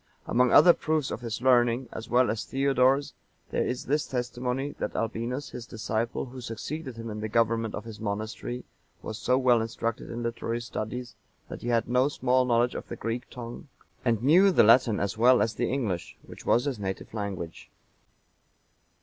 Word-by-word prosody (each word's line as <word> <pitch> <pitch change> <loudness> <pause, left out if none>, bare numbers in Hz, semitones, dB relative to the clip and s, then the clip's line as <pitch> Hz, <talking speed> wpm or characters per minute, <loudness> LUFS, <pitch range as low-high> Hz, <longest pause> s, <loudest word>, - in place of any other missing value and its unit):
Among 125 +1 +3
other 175 - +8
proofs 155 -4 -1
of - - -4
his 115 0 -4
learning, 120 -1 +3
as 110 +1 -7
well 125 -2 +4
as 110 - -3
Theodore's, 135 +1 +2 0.4
there - - +1
is 125 - -3
this 150 +3 0
testimony, 125 +2 -2
that - - -3
Albinus,(941) 115 +5 -3
his 120 -1 -8
disciple, 110 +2 -2
who 130 0 -9
succeeded 125 +4 -6
him 115 -1 -6
in 105 - -5
the 110 0 -3
government 115 0 +1
of 105 - -6
his 110 -2 -9
monastery, 110 +4 -4 0.4
was 110 - -5
so 125 - +2
well 125 -3 +4
instructed 115 0 -3
in 120 +1 -4
literary 115 0 -2
studies, 120 0 -5 0.4
that - - -7
he - - -6
had 115 -1 +1
no 125 +3 +3
small 130 -2 +2
knowledge 120 0 +2
of - - -6
the - - -6
Greek 115 +2 -4
tongue, 120 +2 -8 0.4
and 115 -2 +1
knew 180 +8 +6
the - - +5
Latin 115 0 +5
as 100 +2 -2
well 125 +2 +6
as 110 +2 +1
the 120 +2 -1
English, 110 -10 -2
which - - -12
was 120 +3 +3
his 135 -6 -2
native 95 +1 -5
language. 100 -6 -5
120 Hz, 185 wpm, -27 LUFS, 115-130 Hz, 0.4 s, other